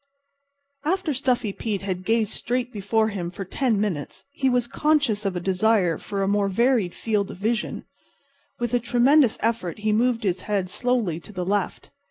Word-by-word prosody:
After 345 0 0
Stuffy 250 -5 0
Pete 205 -3 -3
had 185 -2 -3
gazed 225 -1 +2
straight 250 +1 -2
before 220 +2 +1
him 185 -5 -4
for 190 +2 -7
ten 225 +2 0
minutes 185 -9 -3
he 270 -1 +1
was 245 -1 +2
conscious 275 -7 +1
of 190 - -2
a - - -1
desire 190 -2 +2
for 200 -1 -3
a - - 0
more 200 0 +2
varied 230 -2 +2
field 210 -3 -1
of - - -8
vision. 220 +4 -2 0.7
With 240 0 -3
a 245 - +4
tremendous 245 +2 +4
effort 220 -7 -1
he 215 0 0
moved 235 +1 +2
his 185 -2 0
head 195 -3 0
slowly 230 -8 0
to 210 - -13
the 180 -3 -4
left. 205 +2 -2
215 Hz, 180 wpm, -24 LUFS, 195-245 Hz, 0.7 s, a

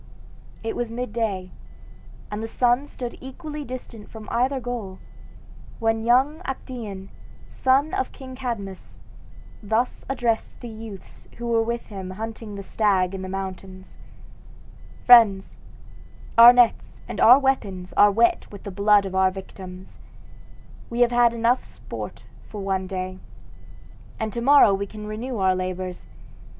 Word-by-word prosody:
It 225 - -3
was 240 -1 -2
midday, 225 -6 -3 0.8
and 210 +1 -4
the 225 - -4
sun 245 +4 +1
stood 245 -4 -7
equally 300 +3 -7
distant 245 -5 -9
from 220 -1 -10
either 260 +3 +1
goal, 230 -6 -5 0.8
when 225 0 0
young 265 +7 +3
Actaeon, 225 - -6 0.4
son 270 +4 +2
of 260 - -1
King 260 -2 -10
Cadmus, 230 -8 -6 0.6
thus 220 +4 -1
addressed 240 -4 -1
the 240 - -8
youths 220 -4 -10
who 240 - -6 0.2
with 235 +1 -3
him 190 -2 -6
were 185 - -7
hunting 220 0 -6
the 200 - -7
stag 195 -3 +1
in 190 - -5
the 185 - -6
mountains: 190 0 -7 1.1
"Friends, 220 -6 +6 0.8
our 235 +1 +11
nets 245 -2 +2
and - - -4
our 245 +3 +9
weapons 205 -10 -1
are 205 - +6
wet 230 +3 +2
with 205 - -11
the 200 - -6
blood 200 +1 +4
of 190 - -5
our 190 0 +4
victims; 185 -1 -10 0.9
we 235 +1 -2
have 240 0 +5
had 240 -1 +4 0.3
sport - - -8
enough - - -22
for 210 - -7
one 190 -1 -1
day, 185 0 -5 1.0
and 220 -2 -3
to 235 - -3
morrow 275 -5 +6
we 200 +1 -2
can 210 +1 -9
renew 225 +4 -5
our 190 -1 +2
labors. 185 0 -5
220 Hz, 140 wpm, -24 LUFS, 195-245 Hz, 1.1 s, our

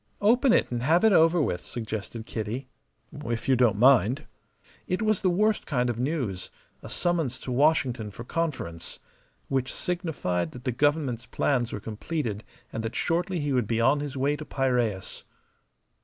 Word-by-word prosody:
"Open 240 +5 +4
it - - +3
and 120 -1 -1
have 160 - +3
it 220 -2 +6
over 165 +1 +5
with," 90 - 0
suggested 110 -1 -5
Kitty. 115 +5 -4 0.6
"If 115 0 -3
you 135 - +5
don't 120 -5 +3
mind." 130 +3 +4 0.6
It 185 +4 -1
was 215 -2 +2
the 185 - +3
worst 210 +4 +1
kind 125 -4 +1
of 120 - -6
news 125 - -2 0.3
a - - -9
summons 165 -8 0
to 130 - -5
Washington 125 -5 +2
for 110 +3 -9
conference. 130 - -3 0.5
Which 130 -2 -1
signified 150 - -2
that 125 - -10
the 130 - 0
Government's 135 -2 0
plans 125 -5 0
were - - -4
completed 110 +1 -4 0.3
and 115 - -2
that 115 +1 -4
shortly 175 0 0
he 145 -1 -1
would 125 -5 +1
be 115 0 0
on 130 +5 +4
his 145 -1 -4
way 140 +3 +1
to 155 - -6
Piraeus. 125 -9 -1
130 Hz, 170 wpm, -27 LUFS, 115-160 Hz, 0.6 s, it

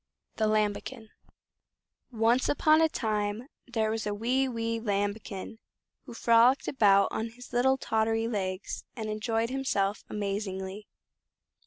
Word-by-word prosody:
The 220 - +2
Lambikin 215 +2 -1 1.0
Once 230 +2 +2
upon 310 +2 +4
a 320 - +4
time 210 -3 -2 0.2
there 220 -3 0
was 220 -1 -2
a 205 - -1
wee 255 +5 +1
wee 230 -1 -2
Lambikin, 205 0 -3 0.5
who 240 - -9
frolicked 235 +3 +4
about 200 -6 +4
on 225 +1 -3
his 245 +2 -14
little 265 +2 +3
tottery 225 -2 0
legs, 190 -4 -3
and 220 -3 -4
enjoyed 225 +2 -1
himself 210 -7 -1
amazingly. 200 -1 -4
220 Hz, 125 wpm, -29 LUFS, 205-240 Hz, 1.0 s, upon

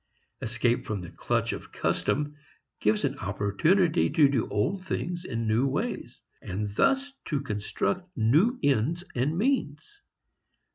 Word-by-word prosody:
Escape 120 +1 +1
from 105 -3 -3
the 85 - -8
clutch - - -1
of - - -8
custom 150 0 0 0.4
gives 105 0 +2
an - - -2
opportunity 165 - +2
to 155 -4 +5
do 135 -5 0
old 175 - 0
things 175 -1 -3
in 115 -5 -2
new 115 +5 +3
ways, 135 - -3 0.2
and 105 +3 -3
thus 275 - +2
to 150 - -1
construct 140 - -2
new 155 - +4
ends 145 +5 +2
and 140 +6 0
means. 265 - -1
145 Hz, 135 wpm, -28 LUFS, 110-180 Hz, 0.4 s, to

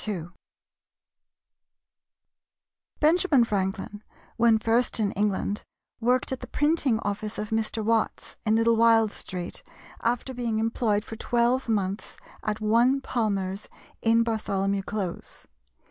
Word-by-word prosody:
Benjamin 315 -4 +4
Franklin, 205 0 -2 0.3
when 230 -1 +4
first 230 +2 +1
in 205 -2 +1
England, 205 0 -1 0.4
worked 250 +3 +1
at 260 - -2
the 250 - -8
printing 295 -5 +1
office 210 +1 -3
of 210 0 -4
Mr. 220 0 -1
Watts, 225 0 0
in 215 0 +2
Little 230 0 +3
Wild 225 -2 +5
Street, 180 -3 -6 0.4
after 245 +3 -1
being 235 -3 -2
employed 220 -1 0
for 225 - -8
twelve 240 +2 +1
months 200 -2 -2 0.2
at 215 0 -2
one 235 +5 +3
Palmer's, 200 -6 -2 0.3
in 230 0 +4
Bartholomew 200 -3 -1
Close. 195 -3 -5
225 Hz, 115 wpm, -26 LUFS, 210-235 Hz, 0.4 s, Wild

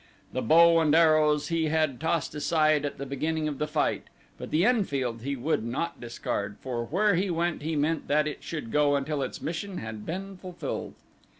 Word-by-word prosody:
The - - -1
bow 165 +5 +6
and 155 -1 +3
arrows 155 -2 +4
he 165 -1 +1
had 155 -4 0
tossed 160 -1 -1
aside 155 -1 +2
at 145 - -4
the 140 - -5
beginning 155 +3 -2
of 145 -3 -4
the 150 - 0
fight 155 -1 0 0.3
but - - -6
the 160 +5 +2
Enfield 140 - 0
he 140 +3 -2
would 135 -1 -1
not 140 +9 -3
discard, 105 -3 -4
for 120 -3 -3
where 200 - +2
he 190 +2 +1
went 170 -1 -1
he 160 +2 -2
meant 155 +2 0
that 150 +1 +2
it 150 - -5
should 150 -9 -5
go 145 -1 +3
until 140 +1 -1
its 130 - -5
mission 180 +4 -4
had 110 -1 -6
been 190 - -5
fulfilled. 180 -1 -6
155 Hz, 195 wpm, -27 LUFS, 140-165 Hz, 0.3 s, bow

